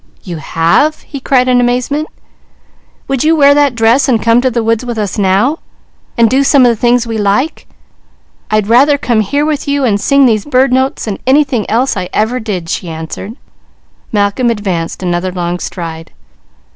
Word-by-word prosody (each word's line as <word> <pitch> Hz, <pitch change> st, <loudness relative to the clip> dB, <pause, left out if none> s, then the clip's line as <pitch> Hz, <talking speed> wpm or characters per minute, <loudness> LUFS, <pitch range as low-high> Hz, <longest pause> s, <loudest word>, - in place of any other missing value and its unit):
"You 175 Hz, -3 st, -6 dB
have?" 170 Hz, -, 0 dB
he 280 Hz, -, -8 dB
cried 255 Hz, -1 st, +1 dB
in 250 Hz, -1 st, +3 dB
amazement. 250 Hz, +5 st, -1 dB, 1.0 s
"Would 270 Hz, -2 st, -1 dB
you 320 Hz, +1 st, +3 dB
wear 285 Hz, -2 st, +5 dB
that 285 Hz, -3 st, +2 dB
dress 230 Hz, +5 st, +2 dB
and 235 Hz, -3 st, +2 dB
come 230 Hz, +2 st, +2 dB
to 260 Hz, -, +1 dB
the 235 Hz, -2 st, -2 dB
woods 225 Hz, +1 st, 0 dB
with 240 Hz, -2 st, -5 dB
us 210 Hz, -1 st, -3 dB
now, 205 Hz, -, +1 dB, 0.6 s
and 230 Hz, -1 st, +4 dB
do 265 Hz, +5 st, +2 dB
some 275 Hz, -2 st, +4 dB
of -, -, +5 dB
the -, -, -1 dB
things 240 Hz, +1 st, +1 dB
we 225 Hz, -1 st, -4 dB
like?" 210 Hz, +10 st, -1 dB, 0.8 s
"I'd 215 Hz, -1 st, +1 dB
rather 265 Hz, +7 st, +4 dB
come 240 Hz, -5 st, 0 dB
here 285 Hz, +8 st, 0 dB
with 300 Hz, -2 st, -2 dB
you, 280 Hz, -1 st, 0 dB
and 205 Hz, -4 st, 0 dB
sing 275 Hz, +3 st, +3 dB
these 220 Hz, -4 st, +2 dB
bird 260 Hz, -2 st, +1 dB
notes 260 Hz, +1 st, 0 dB
than 210 Hz, -3 st, -4 dB
anything 265 Hz, -5 st, +1 dB
else 245 Hz, +5 st, 0 dB
I 180 Hz, -, -4 dB
ever 225 Hz, +4 st, 0 dB
did," 200 Hz, -7 st, -5 dB
she 170 Hz, +1 st, -4 dB
answered. 160 Hz, +6 st, -7 dB, 0.8 s
Malcolm 205 Hz, +4 st, 0 dB
advanced 190 Hz, -6 st, -3 dB
another 175 Hz, +1 st, -2 dB
long 175 Hz, -1 st, -3 dB
stride. 165 Hz, -3 st, -7 dB
235 Hz, 185 wpm, -12 LUFS, 200-270 Hz, 1.0 s, wear